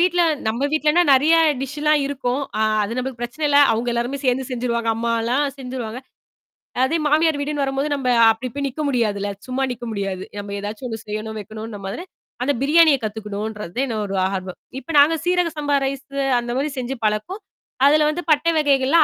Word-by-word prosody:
வீட்ல 355 0 +3 0.3
நம்ம 240 +6 0
வீட்லன்னா 310 +2 +3
நெறைய 295 +5 +5 0.3
டிஷ்லாம் 300 +2 +1
இருக்கும். 265 -1 -2 0.2
அ - - +3 0.2
அது 230 +4 -4
நம்மளுக்கு 255 -1 -4
பிரச்சன 295 +6 -2
இல்ல. 285 - +5
அவுங்க 235 +2 -1
எல்லாருமே 245 +4 -2
சேர்ந்து 255 0 +1
செஞ்சுருவாங்க. 235 -2 -1
அம்மாலாம் 235 +4 0
செஞ்சுருவாங்க. 250 -3 -5 0.9
அதே 325 +5 0
மாமியார் 310 0 +3
வீடுன்னு 290 0 -1
வரும்போது 270 +2 -1
நம்ம 270 -2 -3 0.2
அப்டி 240 +3 -4
போய் 280 -1 -1
நிக்க 290 +4 -5
முடியாதுல்ல. 205 -6 0 0.2
சும்மா 255 +1 -1
நிக்க 240 0 -9
முடியாது. 195 -3 -3 0.2
நம்ம 200 0 -6
ஏதாச்சும் 210 +5 -5
ஒண்ணு 225 -1 -5
செய்யணும், 215 +1 -4
வைக்கணுன 215 +1 -8
மாரி. 265 - -5 0.4
அந்த 285 +3 +1
பிரியாணிய 310 0 +5
கத்துக்கணுன்றது 210 -2 -5
தான் 270 - +2
என்ன 225 -3 -3
ஒரு 195 - -4 0.2
ஆர்வம். 185 -1 -5 0.2
இப்ப - - -25
நாங்க 305 +3 +6
சீரக 355 -1 +2
சம்பா 290 -1 +1
ரைஸு 275 +1 -4 0.2
அந்த 240 0 -4
மாதிரி 290 +3 -1
செஞ்சு 255 +2 -4
பழக்கம். 215 - -1 0.4
அதுல 300 +2 +5
வந்து 335 +3 -2
பட்டை 310 +3 +3
வகைகள்லாம் 285 +1 +4
260 Hz, 175 wpm, -21 LUFS, 220-290 Hz, 0.9 s, நாங்க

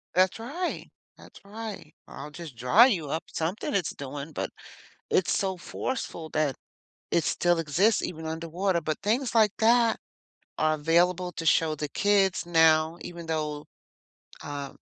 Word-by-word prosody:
That's 185 +2 +3
right. 305 +11 -4 0.3
That's - - -15
right. 210 -6 -8
Or, - - -13
"I'll 145 - -7
just 160 -4 -9
dry 125 - +6
you 165 - -1
up." 160 - -2
Something 170 +7 -2
it's 190 -5 0
doing, 140 +2 -7
but - - -4 0.6
it's 185 - +2
so 190 -1 -1
forceful 175 -3 -5
that 150 -4 0 0.5
it 170 - +2
still 175 0 +2
exists 180 +8 +2
even 160 -2 -5
underwater. 170 +3 -1
But 155 0 -3
things 230 +6 0
like 215 -3 +4
that 230 0 +4 0.6
are 155 0 +2
available 175 +4 +2
to 165 - -6
show 155 0 +3
the 150 0 -4
kids 195 +1 +2
now, 160 -1 +4
even 170 -1 -8
though, 150 -2 -3 0.8
um, 140 -1 -6
170 Hz, 150 wpm, -27 LUFS, 155-200 Hz, 0.8 s, dry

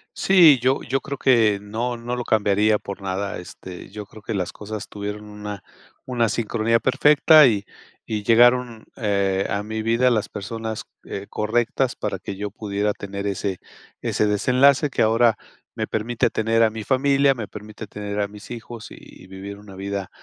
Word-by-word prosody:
Sí, 170 -9 +6
yo 130 +2 +2
yo 135 +1 -1
creo 140 0 -5
que 115 -6 +3
no 115 +4 -3
no 120 +1 -4
lo 125 - -3
cambiaría 105 -1 +2
por 100 0 -8
nada, 95 +1 -3
este, 90 +1 -10
yo 105 +1 -8
creo 110 0 -14
que 110 - -4
las 90 -3 -2
cosas 105 0 -7
tuvieron 105 +1 -6
una 105 -2 -8 0.4
una 120 -3 +1
sincronía 115 +1 +1
perfecta, 150 +5 +6
y 100 -3 0 0.4
y 105 -2 -2
llegaron, 120 0 +4
eh, 100 -3 0
a 100 +1 -1
mi 110 +1 -4
vida 115 +3 +3
las 110 -3 0
personas, 110 +1 -5 0.2
eh, 100 +1 -7
correctas 120 +4 0
para 100 -3 -3
que 95 +1 -7
yo 105 0 -3
pudiera 105 0 -2
tener 100 0 -5
ese 95 -1 -2 0.4
ese - - 0
desenlace 130 +8 +3
que - - -1
ahora 115 0 +3 0.4
me - - -2
permite 115 +2 -1
tener 115 +1 +2
a 110 - +3
mi 110 -1 -6
familia, 135 +1 +3
me 110 -4 -5
permite 105 +1 -9
tener 105 0 -5
a 100 - +1
mis 105 +1 -13
hijos 120 -1 -8
y 95 - -14
vivir 95 +1 -8
una 105 -2 -13
vida, 100 0 -4
110 Hz, 175 wpm, -23 LUFS, 100-120 Hz, 0.4 s, Sí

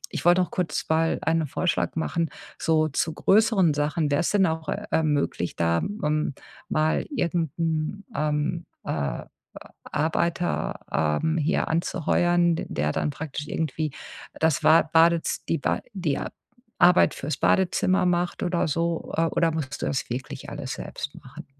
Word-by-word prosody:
ich - - -4
wollte 175 +1 +6
noch 180 - -2
kurz 175 -5 -2
mal 160 +1 +2
einen 160 -1 +1
Vorschlag 175 +5 -1
machen, 165 0 -1 0.3
so 155 -1 +2
zu 155 +2 -1
größeren 195 -6 +4
Sachen. 150 +1 0
Wäre 145 - +2
es - - 0
denn 200 -2 +3
auch, 160 -1 -2
äh, - - -1
möglich, 145 - -1
da 85 0 +1
möm 150 -8 -1 0.3
mal 155 +1 +1
irgend 170 - 0
'n, 165 +4 -1
ähm 150 +3 -1 0.2
äh, 70 -2 -2 0.6
Arbeiter, 170 +3 -1
ähm, 80 - +1
hier 155 0 +1
anzuheuern, 175 +1 +2
d - - -4
der 75 +1 0
dann 150 - -1
praktisch 145 0 -6
irgendwie 155 0 -2 0.5
das 160 -3 +2
Wa 160 +1 +6
Badez 165 +1 +3
die 165 - +2
Ba - - -1
die 165 -8 -1 0.6
Arbeit 180 0 +6
fürs 140 0 -3
Badezimmer 185 0 +2
macht 175 +1 0
oder 175 -2 +1
so, 165 +2 -2
äh, 165 - +2
oder 165 0 +1
musst 155 -4 -4
du - - -1
das 135 - -2
wirklich 130 +3 -5
alles 130 - -5
selbst 145 - -6
machen? 145 +5 -11
160 Hz, 155 wpm, -25 LUFS, 150-170 Hz, 0.6 s, wollte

